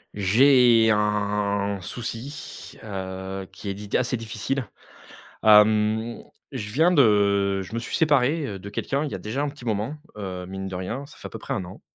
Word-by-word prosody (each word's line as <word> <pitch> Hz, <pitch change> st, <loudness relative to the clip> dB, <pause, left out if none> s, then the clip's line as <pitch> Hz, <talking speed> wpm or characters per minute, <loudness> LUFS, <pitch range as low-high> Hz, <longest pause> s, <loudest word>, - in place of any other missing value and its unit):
J'ai 115 Hz, +2 st, +5 dB
un 105 Hz, -1 st, 0 dB
souci, 120 Hz, +7 st, -7 dB
heu, 95 Hz, -1 st, -5 dB
qui 100 Hz, -, -7 dB
est 95 Hz, -, -3 dB
di 105 Hz, +1 st, -5 dB
assez 125 Hz, 0 st, +1 dB
difficile, 115 Hz, +3 st, -3 dB, 0.8 s
hem, 110 Hz, +1 st, +4 dB, 0.3 s
je 110 Hz, -6 st, -5 dB
viens 160 Hz, +10 st, +4 dB
de 100 Hz, -, +3 dB
je 95 Hz, +4 st, -11 dB
me 115 Hz, -, -2 dB
suis 115 Hz, -, -3 dB
séparé, 150 Hz, 0 st, +2 dB
heu, 100 Hz, -5 st, -5 dB
de 95 Hz, +2 st, -9 dB
quelqu'un 135 Hz, +7 st, -2 dB
il -, -, -5 dB
y -, -, -5 dB
a -, -, -4 dB
déjà 120 Hz, +7 st, -3 dB
un 145 Hz, -, 0 dB
petit 140 Hz, -3 st, -10 dB
moment, 110 Hz, +5 st, -2 dB, 0.2 s
heu, 95 Hz, -3 st, -5 dB
mine 95 Hz, +1 st, -6 dB
de 95 Hz, -, -6 dB
rien, 110 Hz, +10 st, -4 dB
ça -, -, -16 dB
fait -, -, -9 dB
à -, -, -19 dB
peu -, -, -7 dB
près -, -, -4 dB
1 95 Hz, -, -3 dB
an, 90 Hz, +2 st, -11 dB
105 Hz, 190 wpm, -24 LUFS, 100-125 Hz, 0.8 s, J'ai